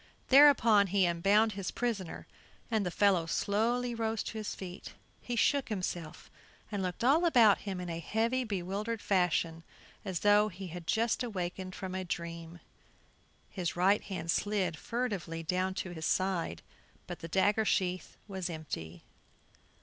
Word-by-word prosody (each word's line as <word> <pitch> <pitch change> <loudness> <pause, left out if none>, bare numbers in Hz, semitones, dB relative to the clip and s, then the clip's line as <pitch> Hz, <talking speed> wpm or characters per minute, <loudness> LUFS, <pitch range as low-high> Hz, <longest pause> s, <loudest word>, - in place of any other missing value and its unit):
Thereupon, 255 -7 +7
he 195 0 +3
unbound 195 +6 +3
his 195 -2 -4
prisoner, 220 -8 -3 0.5
and 220 -2 +2
the 180 - -1
fellow 185 -3 +2
slowly 235 +7 0
rose 225 -1 -1
to 220 - -5
his 215 - -4
feet. 185 0 -9 0.3
He 245 - -4
shook 270 +4 +2
himself 180 -6 -5 0.4
and 205 -2 -2
looked 180 +3 -3
all 285 +7 +4
about 235 - +5
him 190 -2 -3
in 180 - -5
a 165 -1 -4
heavy, 230 - 0
bewildered 205 +2 -3
fashion, 175 -4 0 0.4
as 185 -4 -3
though 205 +1 +5
he 190 -1 -8
had 170 0 -8
just 230 +3 +1
awakened 185 -4 -4
from 190 -1 -6
a 185 0 -3
dream. 170 -1 -6 0.9
His 180 -4 -3
right 190 +4 +3
hand 175 -4 -3
slid 195 -5 0
furtively 190 -6 -3
down 185 +3 -1
to 190 -2 -4
his 160 -2 -4
side, 185 - -1 0.4
but - - -7
the 165 - -7
dagger 205 +5 +2
sheath 185 -3 -1
was 190 -3 -4
empty. 85 - -6
190 Hz, 150 wpm, -31 LUFS, 175-220 Hz, 0.9 s, Thereupon